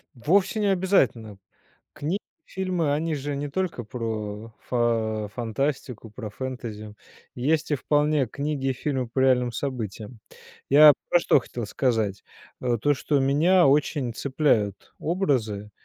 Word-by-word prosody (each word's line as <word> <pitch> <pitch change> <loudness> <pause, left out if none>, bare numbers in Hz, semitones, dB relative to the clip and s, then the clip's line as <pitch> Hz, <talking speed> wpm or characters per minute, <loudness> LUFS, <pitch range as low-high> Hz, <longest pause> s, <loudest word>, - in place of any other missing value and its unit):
Вовсе 185 - +2
не 210 - +1
обязательно. 135 - +1 0.6
Кни 160 +7 -2 0.3
фильмы 180 -6 -1
они 155 +2 -1
же 145 0 -4
не 145 +1 -4
только 170 -5 -2
про 110 -2 -5
фа 115 -3 0
фантастику, 120 0 -3
про 110 0 -7
фэнтези, 110 -3 -7 0.4
есть 150 +6 0
и - - +3
вполне 145 0 +1
книги, 140 +1 -2
фильмы 130 -1 -2
по 120 +3 -3
реальным 125 -2 +3
событиям. 115 -3 -5 0.5
Я 150 +2 +9 0.2
про 175 - +5
что 170 - +4
хотел 120 -2 -6
сказать, 110 -4 -1 0.4
э: 120 -2 0
то 145 - +3
что 145 +1 0
меня 150 +6 +4
очень 140 -3 +1
цепляют 120 -7 0
образы 120 - -1
130 Hz, 130 wpm, -25 LUFS, 115-150 Hz, 0.6 s, Я